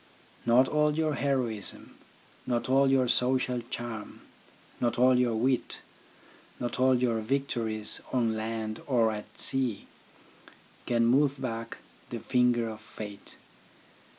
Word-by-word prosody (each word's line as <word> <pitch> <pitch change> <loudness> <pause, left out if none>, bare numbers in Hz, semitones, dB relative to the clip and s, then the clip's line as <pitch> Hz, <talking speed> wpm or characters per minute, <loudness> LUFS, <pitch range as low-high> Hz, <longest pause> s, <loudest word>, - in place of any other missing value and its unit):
Not 125 +3 +5
all 150 0 +2
your 155 -1 +1
heroism, 125 -8 -2 0.5
not 120 -1 0
all 135 +1 +4
your 130 -2 +3
social 125 0 +1
charm, 115 -3 -6 0.6
not 120 -1 0
all 125 0 +5
your 120 -2 +2
wit, 125 +3 0 0.8
not 120 0 -3
all 130 0 +5
your 120 -2 +1
victories 115 -3 -1
on 115 -3 +1
land 110 0 -4
or 115 -5 +3
at 105 -1 -8
sea, 130 -6 0 1.0
can 115 -1 +2
move 140 +3 +3
back 115 -3 -4 0.3
the - - -4
finger 125 -2 +2
of 110 -1 -7
fate. 105 -2 -9
120 Hz, 125 wpm, -29 LUFS, 115-130 Hz, 1.0 s, Not